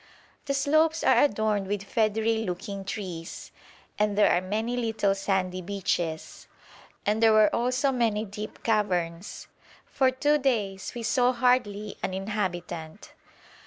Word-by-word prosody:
The 280 Hz, -1 st, -1 dB
slopes 310 Hz, +4 st, +2 dB
are -, -, +5 dB
adorned 215 Hz, -5 st, 0 dB
with 200 Hz, 0 st, -2 dB
feathery 220 Hz, +2 st, +1 dB
looking 195 Hz, 0 st, -4 dB
trees, 185 Hz, -4 st, -6 dB, 0.5 s
and 210 Hz, -1 st, +1 dB
there 210 Hz, -, +5 dB
are 175 Hz, -, +3 dB
many 220 Hz, +6 st, -2 dB
little 225 Hz, -4 st, +1 dB
sandy 190 Hz, -2 st, -1 dB
beaches, 175 Hz, -4 st, -3 dB, 0.6 s
and 215 Hz, +2 st, +1 dB
there 225 Hz, -1 st, +6 dB
were 215 Hz, -1 st, +5 dB
also 255 Hz, +4 st, +1 dB
many 225 Hz, -4 st, 0 dB
deep 210 Hz, +1 st, -8 dB
caverns. 180 Hz, -5 st, -1 dB, 0.4 s
For 265 Hz, -1 st, +2 dB
two 290 Hz, +3 st, +2 dB
days 210 Hz, -8 st, -1 dB
we 235 Hz, -, -5 dB
saw 250 Hz, +1 st, +2 dB
hardly 230 Hz, -5 st, +1 dB
an 185 Hz, -, -2 dB
inhabitant. 185 Hz, -4 st, -4 dB
210 Hz, 130 wpm, -27 LUFS, 195-235 Hz, 0.6 s, there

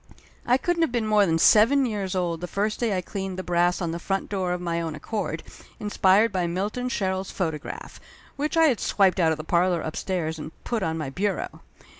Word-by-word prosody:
I 250 Hz, +1 st, +5 dB
couldn't 345 Hz, +5 st, 0 dB
have 325 Hz, -, +2 dB
been 235 Hz, -2 st, 0 dB
more 210 Hz, -2 st, +4 dB
than 165 Hz, -1 st, +2 dB
seven 230 Hz, +10 st, +5 dB
years 200 Hz, -5 st, -3 dB
old 170 Hz, -3 st, -1 dB
the 180 Hz, -, -4 dB
first 210 Hz, +4 st, -1 dB
day 220 Hz, -5 st, 0 dB
I -, -, -1 dB
cleaned 190 Hz, 0 st, -5 dB
the 185 Hz, -, -4 dB
brass 175 Hz, 0 st, +1 dB
on 165 Hz, -, -1 dB
the 170 Hz, -, -4 dB
front 195 Hz, +2 st, -2 dB
door 190 Hz, -3 st, -1 dB
of 180 Hz, -, -1 dB
my 170 Hz, -1 st, -2 dB
own 160 Hz, -2 st, -4 dB
accord, 215 Hz, +6 st, -4 dB, 0.4 s
inspired 205 Hz, +1 st, +3 dB
by 180 Hz, -2 st, 0 dB
Milton 205 Hz, +8 st, -2 dB
Sherrill's 190 Hz, -5 st, -1 dB
photograph, 160 Hz, -5 st, -5 dB, 0.4 s
which 300 Hz, +3 st, -2 dB
I 325 Hz, -, +6 dB
had 270 Hz, -8 st, +3 dB
swiped 190 Hz, -2 st, +2 dB
out 165 Hz, -2 st, +4 dB
of 160 Hz, -, -1 dB
the 155 Hz, -, -6 dB
parlor 175 Hz, +1 st, +2 dB
upstairs 160 Hz, 0 st, -3 dB
and 155 Hz, +1 st, -7 dB
put 235 Hz, -3 st, -2 dB
on 160 Hz, -3 st, -1 dB
my 150 Hz, -4 st, -4 dB
bureau. 200 Hz, +6 st, -2 dB
190 Hz, 215 wpm, -25 LUFS, 170-215 Hz, 0.4 s, I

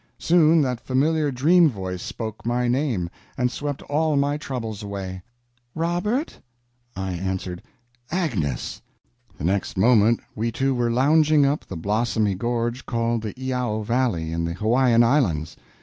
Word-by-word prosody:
Soon 165 Hz, -1 st, +4 dB
that 125 Hz, -3 st, -1 dB
familiar 150 Hz, +3 st, +1 dB
dream 160 Hz, +6 st, +4 dB
voice 95 Hz, -6 st, -5 dB
spoke 110 Hz, -2 st, -6 dB
my 120 Hz, +1 st, 0 dB
name, 120 Hz, -, 0 dB, 0.3 s
and 125 Hz, -2 st, +1 dB
swept 145 Hz, 0 st, -4 dB
all 155 Hz, +1 st, 0 dB
my 140 Hz, +1 st, +1 dB
troubles 115 Hz, -7 st, -5 dB
away: 95 Hz, -2 st, -6 dB, 0.5 s
"Robert!" 175 Hz, -, -1 dB, 0.6 s
I 95 Hz, 0 st, -3 dB
answered: 90 Hz, 0 st, -4 dB, 0.5 s
"Agnes!" 110 Hz, -, -2 dB, 0.6 s
The -, -, -8 dB
next 95 Hz, +3 st, -1 dB
moment 115 Hz, +2 st, +4 dB
we 115 Hz, +2 st, -2 dB
two 135 Hz, +3 st, 0 dB
were 120 Hz, -2 st, 0 dB
lounging 150 Hz, +4 st, +4 dB
up 140 Hz, +2 st, 0 dB
the 95 Hz, -, -6 dB
blossomy 105 Hz, +3 st, 0 dB
gorge 120 Hz, +4 st, -2 dB
called 115 Hz, -1 st, 0 dB
the 110 Hz, -2 st, -5 dB
Iao 125 Hz, -4 st, -2 dB
Valley, 115 Hz, -9 st, 0 dB
in 85 Hz, 0 st, -2 dB
the 85 Hz, 0 st, -2 dB
Hawaiian 115 Hz, +5 st, +3 dB
Islands. 100 Hz, -, +1 dB
120 Hz, 140 wpm, -23 LUFS, 100-140 Hz, 0.6 s, Soon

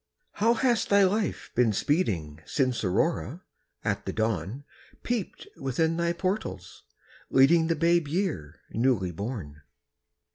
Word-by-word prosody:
How 230 Hz, +3 st, +2 dB
has 240 Hz, -1 st, +2 dB
thy 200 Hz, 0 st, +4 dB
life 205 Hz, +2 st, 0 dB
been 120 Hz, -3 st, +3 dB
speeding 90 Hz, -, -1 dB
Since 130 Hz, -5 st, 0 dB
Aurora, 160 Hz, -, 0 dB, 0.4 s
at 100 Hz, -2 st, -1 dB
the -, -, 0 dB
dawn, 110 Hz, -, -2 dB, 0.4 s
Peeped 240 Hz, -6 st, -3 dB
within 160 Hz, +5 st, 0 dB
thy 170 Hz, 0 st, +1 dB
portals, 170 Hz, -, -3 dB, 0.5 s
leading 160 Hz, +5 st, +5 dB
The 165 Hz, -, +1 dB
babe 170 Hz, 0 st, +2 dB
year, 145 Hz, -, -3 dB
newly 115 Hz, -7 st, +1 dB
born? 90 Hz, -, -6 dB
135 Hz, 120 wpm, -27 LUFS, -, 0.5 s, leading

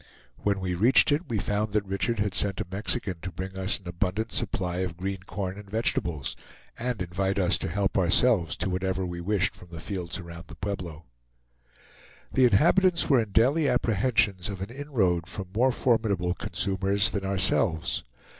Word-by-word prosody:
When 100 Hz, +3 st, 0 dB
we 95 Hz, -1 st, -2 dB
reached 115 Hz, -, +5 dB
it, 150 Hz, +3 st, 0 dB
we 115 Hz, -, 0 dB
found 105 Hz, +2 st, -1 dB
that 105 Hz, -1 st, +1 dB
Richard 100 Hz, +4 st, -1 dB
had 100 Hz, -1 st, 0 dB
sent 100 Hz, -2 st, 0 dB
a -, -, -2 dB
Mexican 100 Hz, -1 st, -2 dB
to 95 Hz, -, -5 dB
bring 95 Hz, +2 st, -6 dB
us 95 Hz, +1 st, 0 dB
an 95 Hz, -, -14 dB
abundant 95 Hz, +6 st, -2 dB
supply 90 Hz, -2 st, -2 dB
of 90 Hz, -3 st, -3 dB
green 95 Hz, +1 st, -3 dB
corn 95 Hz, +1 st, -4 dB
and 100 Hz, -1 st, -12 dB
vegetables, 85 Hz, -9 st, -1 dB, 0.4 s
and 120 Hz, -5 st, -2 dB
invite 95 Hz, +2 st, -1 dB
us 90 Hz, -2 st, +2 dB
to -, -, -2 dB
help 100 Hz, +3 st, 0 dB
ourselves 90 Hz, 0 st, +4 dB
to -, -, -1 dB
whatever 95 Hz, 0 st, -1 dB
we 85 Hz, -1 st, -5 dB
wished 95 Hz, 0 st, 0 dB
from 90 Hz, -, -15 dB
the 85 Hz, -1 st, -8 dB
fields 90 Hz, -2 st, -4 dB
around 85 Hz, -2 st, -9 dB
the -, -, -11 dB
Pueblo. 90 Hz, -5 st, -5 dB, 1.3 s
The 130 Hz, -, +5 dB
inhabitants 170 Hz, -, +4 dB
were 130 Hz, -3 st, +6 dB
in 110 Hz, -, -4 dB
daily 135 Hz, +9 st, +3 dB
apprehensions 110 Hz, -5 st, +1 dB
of 100 Hz, -2 st, -5 dB
an 100 Hz, +4 st, -5 dB
inroad 110 Hz, -, 0 dB
from 95 Hz, -2 st, -6 dB
more 130 Hz, +4 st, +4 dB
formidable 105 Hz, -8 st, +1 dB
consumers 100 Hz, +4 st, 0 dB
than 100 Hz, -, -3 dB
ourselves. 95 Hz, -2 st, +1 dB
95 Hz, 175 wpm, -27 LUFS, 90-110 Hz, 1.3 s, were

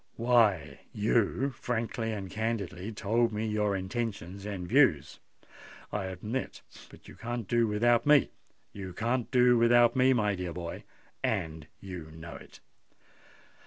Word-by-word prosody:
"Why—you 110 Hz, -, +1 dB
frankly 115 Hz, -2 st, -3 dB
and 100 Hz, -3 st, -4 dB
candidly 105 Hz, -3 st, -3 dB
told 115 Hz, +3 st, +1 dB
me 105 Hz, +1 st, -2 dB
your 105 Hz, -2 st, 0 dB
intentions 95 Hz, -1 st, -4 dB
and 95 Hz, -4 st, -5 dB
views, 110 Hz, -, +3 dB, 0.7 s
I 105 Hz, -2 st, -2 dB
admit;—but 105 Hz, +7 st, -7 dB
you -, -, -11 dB
can't 120 Hz, -2 st, -5 dB
do 120 Hz, +1 st, +2 dB
without 120 Hz, +5 st, +2 dB
me—you 100 Hz, -9 st, 0 dB
can't 120 Hz, +5 st, -1 dB
do 125 Hz, -2 st, +5 dB
without 120 Hz, 0 st, +5 dB
me, 130 Hz, 0 st, +5 dB
my 105 Hz, -4 st, +1 dB
dear 90 Hz, -3 st, -4 dB
boy—and 80 Hz, -2 st, -5 dB
you 90 Hz, -5 st, -8 dB
know 85 Hz, +1 st, -9 dB
it!" -, -, -13 dB
110 Hz, 120 wpm, -29 LUFS, 95-120 Hz, 0.7 s, do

